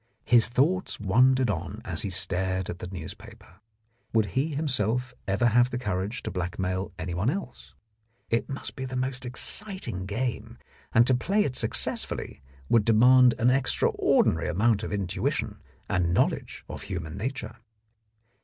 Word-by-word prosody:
His 120 Hz, -2 st, +5 dB
thoughts 155 Hz, +10 st, +1 dB
wandered 125 Hz, +4 st, +3 dB
on 95 Hz, +4 st, -5 dB
as 85 Hz, -4 st, -1 dB
he 100 Hz, -, -3 dB
stared 95 Hz, 0 st, -1 dB
at 90 Hz, -, -8 dB
the 90 Hz, -, -6 dB
newspaper. 90 Hz, +1 st, -10 dB, 0.5 s
Would 110 Hz, -2 st, +3 dB
he 140 Hz, +3 st, 0 dB
himself 130 Hz, -3 st, 0 dB
ever 100 Hz, +5 st, +1 dB
have 120 Hz, +1 st, +4 dB
the 120 Hz, -, -3 dB
courage 105 Hz, -2 st, -3 dB
to -, -, -4 dB
blackmail 90 Hz, +1 st, -3 dB
anyone 90 Hz, +5 st, -1 dB
else? 70 Hz, -, -6 dB, 0.6 s
It 115 Hz, -, 0 dB
must 135 Hz, -, -5 dB
be 130 Hz, -, -5 dB
the 130 Hz, 0 st, -6 dB
most 130 Hz, 0 st, -2 dB
exciting 125 Hz, -, -1 dB
game, 120 Hz, +4 st, -3 dB, 0.3 s
and 120 Hz, -, +5 dB
to 130 Hz, -, +3 dB
play 195 Hz, +12 st, +2 dB
it 130 Hz, -, -3 dB
successfully -, -, -2 dB, 0.3 s
would 115 Hz, -, +4 dB
demand 125 Hz, +3 st, +6 dB
an 120 Hz, +2 st, +3 dB
extraordinary 130 Hz, 0 st, +2 dB
amount 105 Hz, +3 st, +2 dB
of 110 Hz, -, -5 dB
intuition 100 Hz, -4 st, -2 dB, 0.3 s
and 85 Hz, -1 st, +1 dB
knowledge -, -, 0 dB
of -, -, -7 dB
human 85 Hz, -5 st, -5 dB
nature. 120 Hz, +1 st, -5 dB
115 Hz, 145 wpm, -27 LUFS, 95-130 Hz, 0.6 s, demand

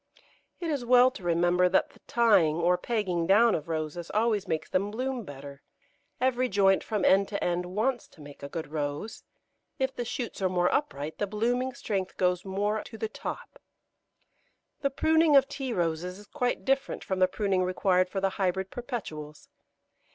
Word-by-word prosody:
It 335 Hz, -2 st, -2 dB
is 280 Hz, -4 st, -2 dB
well 250 Hz, +1 st, +6 dB
to 255 Hz, -, -11 dB
remember 175 Hz, +1 st, +3 dB
that 190 Hz, -, +2 dB
the -, -, -21 dB
tying 210 Hz, -10 st, +4 dB
or 170 Hz, +2 st, +3 dB
pegging 180 Hz, -4 st, -1 dB
down 220 Hz, +4 st, +5 dB
of 150 Hz, -, -2 dB
Roses 160 Hz, +1 st, -3 dB
always 215 Hz, -2 st, +1 dB
makes 160 Hz, -2 st, -2 dB
them 195 Hz, +2 st, 0 dB
bloom 255 Hz, +2 st, -3 dB
better: 140 Hz, -3 st, -10 dB, 0.6 s
every 255 Hz, 0 st, +1 dB
joint 195 Hz, -1 st, +3 dB
from 210 Hz, -4 st, -1 dB
end 195 Hz, +1 st, +5 dB
to 200 Hz, -, -3 dB
end 180 Hz, 0 st, -1 dB
wants 225 Hz, +6 st, -1 dB
to 160 Hz, -, -18 dB
make 145 Hz, -1 st, -12 dB
a 140 Hz, -, -6 dB
good 160 Hz, -1 st, -6 dB
Rose; 150 Hz, +7 st, -4 dB, 0.5 s
if 265 Hz, -2 st, -1 dB
the 240 Hz, -, -2 dB
shoots 235 Hz, -2 st, -5 dB
are 190 Hz, -, +2 dB
more 180 Hz, 0 st, +1 dB
upright, 155 Hz, -, -2 dB
the 205 Hz, -, 0 dB
blooming 245 Hz, +5 st, -1 dB
strength 190 Hz, -3 st, -3 dB
goes 180 Hz, -1 st, +1 dB
more 205 Hz, +2 st, -1 dB
to 225 Hz, -, -10 dB
the 220 Hz, -, -3 dB
top. -, -, -7 dB, 1.2 s
The 275 Hz, -, 0 dB
pruning 315 Hz, +2 st, +3 dB
of 275 Hz, -1 st, +6 dB
Tea 275 Hz, -2 st, -4 dB
Roses 175 Hz, -1 st, -2 dB
is 205 Hz, -, -13 dB
quite 250 Hz, +2 st, -2 dB
different 270 Hz, 0 st, 0 dB
from 190 Hz, -1 st, -2 dB
the 185 Hz, -, +5 dB
pruning 195 Hz, -1 st, 0 dB
required 185 Hz, 0 st, +2 dB
for 195 Hz, -, -2 dB
the 195 Hz, 0 st, +1 dB
Hybrid 190 Hz, +1 st, 0 dB
Perpetuals. 160 Hz, -, -7 dB
195 Hz, 180 wpm, -28 LUFS, 175-240 Hz, 1.2 s, well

